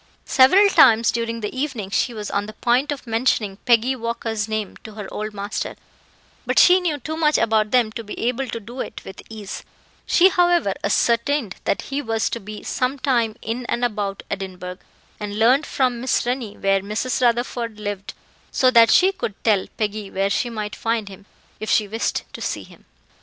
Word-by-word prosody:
Several 370 +11 +6
times 230 - +5
during 230 0 -3
the 210 +4 -4
evening, 260 -8 -3
she 245 - +1
was 210 -3 -6
on 205 +1 -1
the 215 - -8
point 245 +6 +1
of 280 -3 -5
mentioning 225 -4 0
Peggy 245 +2 +3
Walker's 230 -3 -3
name 215 -2 -3
to 220 - -12
her 205 -2 -7
old 215 +1 -4
master, 205 0 -4 0.7
but - - -2
she 365 +1 +7
knew 340 -5 -1
too 305 +4 -5
much 305 -2 +3
about 220 -1 +2
them 240 -2 +3
to 230 +1 -6
be 210 - -8
able 250 +3 -1
to 230 - -5
do 235 +4 -10
it - - -6
with 190 - -9
ease; 215 -3 -7 0.4
she, 370 +2 +6
however, 350 - +2
ascertained 235 +2 +1
that - - 0
he 275 +1 -3
was 225 -4 -1
to 235 - -3
be 210 +1 -9
some 255 +2 -1
time 240 -5 +1
in 230 +3 -3
and 240 +1 0
about 205 -4 -3
Edinburgh, 185 -2 -5 0.4
and 205 0 -5
learned 255 +7 +4
from 250 -3 0
Miss 255 -1 +1
Rennie 245 -4 -3
where 195 0 +2
Mrs. 225 +6 -2
Rutherford 235 -2 0
lived, 205 -2 -5 0.4
so 255 -1 +3
that 230 -2 +7
she 375 +10 +5
could 220 - -5
tell 210 -4 +2
Peggy 210 -1 -2
where 195 +1 -1
she 240 - 0
might 210 -3 -5
find 225 -2 -2
him, 195 +1 -13 0.3
if 215 - -5
she 210 - +3
wished 225 +3 -2
to - - -8
see - - -3
him. - - -18
230 Hz, 190 wpm, -22 LUFS, 210-255 Hz, 0.7 s, she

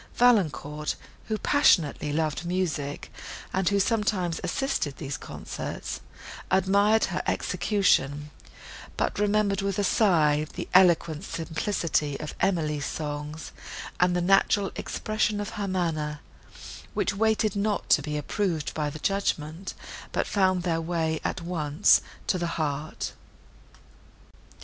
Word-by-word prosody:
Valancourt, 150 - +2 0.3
who 215 -1 -1
passionately 170 - +3
loved 155 +1 -1
music, 170 -5 -2 0.4
and 190 -1 +2
who 200 0 +2
sometimes 195 -5 0
assisted 270 - -1
at - - -25
these 140 -3 -4
concerts, - - -6 0.5
admired 200 +3 +4
her - - -2
execution, 150 -8 +1 0.7
but - - -1
remembered 205 -1 +2
with 195 -1 -1
a 205 - +1
sigh 155 -8 +3
the - - -4
eloquent 170 -3 +4
simplicity 160 -4 -1
of 150 - -5
Emily's 155 -6 0
songs 150 0 -5 0.5
and 180 0 +3
the 175 - +1
natural 195 +2 +3
expression 215 -1 -1
of 205 - -3
her 205 -1 -4
manner, 155 -5 -1 0.7
which - - +1
waited 215 0 +1
not 205 0 0
to - - +6
be 150 +1 -3
approved 160 0 -1
by 150 -1 -1
the 145 - -7
judgment, 170 -1 -2 0.4
but - - 0
found 185 -3 +2
their 165 -2 0
way 160 -1 -1
at 180 - -2
once 155 -4 +3 0.2
to 185 - +1
the 170 - -1
heart. 150 -1 -3
175 Hz, 125 wpm, -27 LUFS, 150-200 Hz, 0.7 s, to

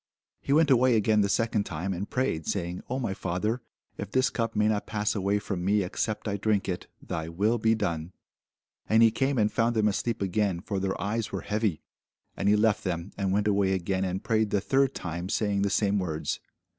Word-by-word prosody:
He - - -4
went 150 0 +4
away 130 -1 +5
again 105 0 +3
the 100 - +1
second 115 0 +1
time, 90 +2 -3
and 95 +3 -4
prayed, 125 - -1
saying, 90 -2 -2
O 130 - -1
my 115 -7 -2
Father, 95 +7 -2 0.4
if 100 - -4
this 130 +4 +2
cup 115 -1 -2
may 105 0 +3
not 105 -1 0
pass 105 -1 0
away 100 0 +1
from 100 -3 -4
me, 100 +2 +2
except 105 +4 -3
I 100 -1 -1
drink 105 0 +1
it, 90 -2 -3 0.2
thy 80 0 -4
will 105 +8 +1
be 110 +1 +3
done. 85 -5 -2 0.8
And 110 +1 +6
he 115 - +6
came 135 +4 0
and 105 -1 +2
found 115 0 +1
them 110 -1 +3
asleep 105 +1 -1
again: 95 -1 0
for 100 +1 -3
their 95 0 -2
eyes 110 +2 -2
were - - -3
heavy. 105 -5 -1 0.5
And 100 - +1
he 105 - +5
left 105 0 +2
them, 90 0 -3
and 100 -2 -1
went 105 +2 +1
away 100 -2 +2
again, 95 +1 -1
and 95 0 -2
prayed 110 -1 +1
the 100 - +1
third 135 +5 +1
time, 85 +1 -4
saying 105 -2 0
the 100 - +1
same 100 0 +2
words. 80 -4 -2
105 Hz, 215 wpm, -28 LUFS, 95-110 Hz, 0.8 s, And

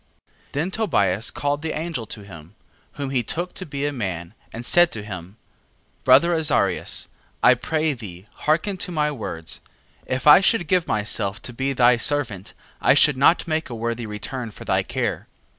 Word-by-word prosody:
9:1. - - -64 0.3
Then 160 +7 -1
Tobias 110 - +1
called 145 0 -2
the 160 0 -3
angel 155 -8 -4
to 105 - -8
him, 85 -1 -13 0.4
whom 140 -2 -5
he 130 -2 +1
took 175 +10 -3
to 185 - -7
be 140 0 -3
a 145 - -1
man, 95 -7 -4 0.2
and 115 +2 -7
said 175 +4 +5
to 105 - -6
him: 95 -1 -8 0.7
Brother 135 +7 +6
Azarias, 150 - +1 0.4
I - - +8
pray 155 +5 -1
thee 100 -7 -10
hearken 170 +6 0
to 180 - -3
my 150 -2 0
words: 85 - -6 0.5
9:2. - - -2
If 130 - -5
I 150 +5 +9
should 190 -4 +2
give 180 -1 +2
myself 105 0 -1
to 120 - -6
be 135 +3 -1
thy 120 -1 +5
servant 115 -7 0 0.3
I - - +5
should 150 -1 +5
not 140 +7 +3
make 160 -2 -1
a 120 - -5
worthy 115 0 -3
return 110 +4 -5
for 105 - -11
thy - - +2
care. - - -3
130 Hz, 185 wpm, -23 LUFS, 105-155 Hz, 0.7 s, I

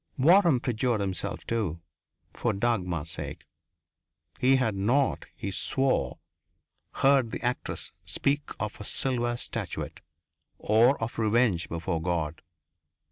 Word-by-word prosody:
Waram 170 0 +5
perjured 120 -1 0
himself, 95 -3 -3
too 105 -8 -1 0.5
for - - 0
Dagmar's 90 -8 0
sake. - - -6 0.9
He 130 +1 +5
had 125 -5 +1
not, 120 +8 +1
he 100 - -4
swore, 130 - 0 0.8
heard 135 -3 +4
the - - -6
actress 125 +1 -3
speak 140 - 0
of 105 0 -4
a - - -5
silver 120 +1 0
statuette, - - -5 0.6
or 115 +6 +4
of 115 - -4
revenge 110 -5 +2
before 85 0 -2
God.... 80 -3 -2
115 Hz, 115 wpm, -28 LUFS, 95-130 Hz, 0.9 s, Waram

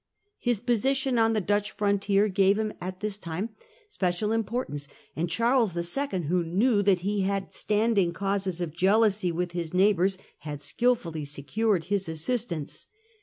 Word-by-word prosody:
His 240 -4 0
position 260 +2 +1
on 225 0 +4
the 215 - +2
Dutch 205 +2 0
frontier 200 0 +1
gave 195 0 +3
him 215 -1 -1
at 185 +1 -6
this 210 -1 -2
time 175 +6 -4 0.4
special 200 - -1
importance, 225 - -2 0.3
and 165 +3 -1
Charles 230 -1 +2
II., 185 +3 -1
who 175 +3 +1
knew 205 +6 +2
that 195 -3 +3
he 200 +2 0
had 195 0 -2
standing 210 -4 +1
causes 195 0 -2
of 165 -3 -4
jealousy 195 0 +3
with 175 +1 -2
his 170 -1 -4
neighbours, 190 0 +3 0.2
had 145 -1 -6
skilfully 165 - 0
secured 170 +7 -1
his 195 0 -1
assistance. 165 - -3
195 Hz, 150 wpm, -27 LUFS, 175-220 Hz, 0.4 s, on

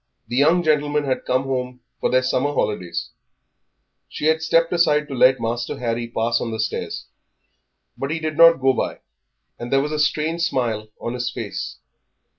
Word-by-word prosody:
The 120 - -3
young 160 +6 +4
gentlemen 150 -1 +1
had 135 -2 -2
come 130 +1 +1
home 125 -2 -3 0.2
for - - 0
their 130 0 +3
summer 130 +3 +1
holidays; 90 -5 -2 1.0
she - - -5
had 160 0 +3
stepped 165 +1 +2
aside 150 -4 +3
to 140 - -7
let 130 0 +4
Master 120 +1 -3
Harry 115 -1 -2
pass 115 0 0
on 120 - -2
the 110 0 -5
stairs. 110 - -3 0.9
But 135 - -4
he 160 +2 -2
did 155 -1 -3
not 165 0 +7
go 135 0 +4
by, - - -3 0.6
and 120 0 -6
there 135 - +4
was 150 +2 -2
a 155 - -2
strange 155 +2 0
smile 115 -9 -1
on 120 - -4
his 125 0 -2
face. 115 -4 -5
135 Hz, 180 wpm, -22 LUFS, 120-155 Hz, 1.0 s, not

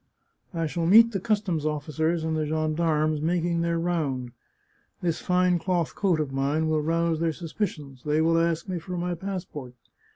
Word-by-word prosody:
I 165 -1 0
shall 165 +2 -1
meet 225 +5 +7
the 195 - -2
customs 200 -6 0
officers 155 +2 -1
and 160 0 -1
the 155 -1 -1
gendarmes 155 -1 +1
making 170 +1 0
their 170 0 0
round. 150 -8 -1 0.7
This 170 -2 0
fine 180 -1 +2
cloth 175 -1 -1
coat 185 -6 +1
of 150 -3 -2
mine 140 +4 0
will 155 -1 +1
rouse 165 +1 +1
their 165 -1 +1
sus 165 -1 -8
picions; 145 - -4
they 150 +1 +1
will 165 +1 +3
ask 165 +1 0
me 185 -2 -2
for 180 +2 -6
my 175 +1 -1
passport. 170 -8 -6
165 Hz, 175 wpm, -26 LUFS, 155-175 Hz, 0.7 s, meet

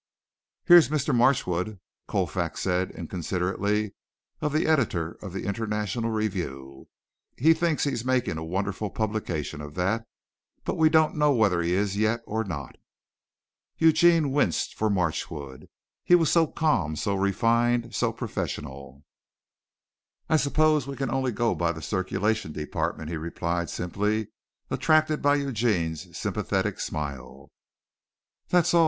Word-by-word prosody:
"Here's 175 -4 +8
Mr. 150 -1 0
Marchwood," 110 -6 +1 0.3
Colfax - - -2
said 90 0 0
inconsiderately 95 +4 -2 0.5
of 150 - 0
the 155 +2 +1
editor 110 - +1
of 100 - -7
the 95 - -5
International 105 +2 -2
Review. 85 -12 -4 0.5
"He 160 +6 +5
thinks 165 -1 0
he's 130 -6 -1
making 125 -10 0
a - - -5
wonderful 95 +4 -2
publication 95 -10 -3
of 75 0 -9
that, 105 +6 -1 0.6
but - - -2
we 160 -1 +4
don't 155 -1 +3
know 150 -1 +4
whether 105 -8 +2
he 85 +1 0
is 100 0 0
yet 110 +2 +1
or 110 +1 -2
not." 75 - -6 1.0
Eugene 165 -2 +4
winced 135 - +1
for 110 - 0
Marchwood. 80 -7 -3 0.3
He 175 - +6
was 165 -4 +3
so 165 -2 +4
calm, 115 - 0
so 100 +6 -1
refined, 115 +5 +1
so - - +1
professional. 70 0 -6 1.2
"I 160 - +4
suppose 155 -1 +2
we 140 - -5
can 135 -3 -2
only 130 -1 0
go 120 +1 +1
by 85 -1 0
the 80 - -8
circulation 95 - -1
department," 75 +1 -3
he 85 - -2
replied 85 +1 -3
simply, 105 +4 -1 0.4
attracted 155 -1 +2
by 145 0 +4
Eugene's 110 - -1
sympathetic - - -1
smile. 70 -3 -6 1.0
"That's 175 -2 +3
all! 170 - +6
105 Hz, 135 wpm, -26 LUFS, 85-140 Hz, 1.2 s, Here's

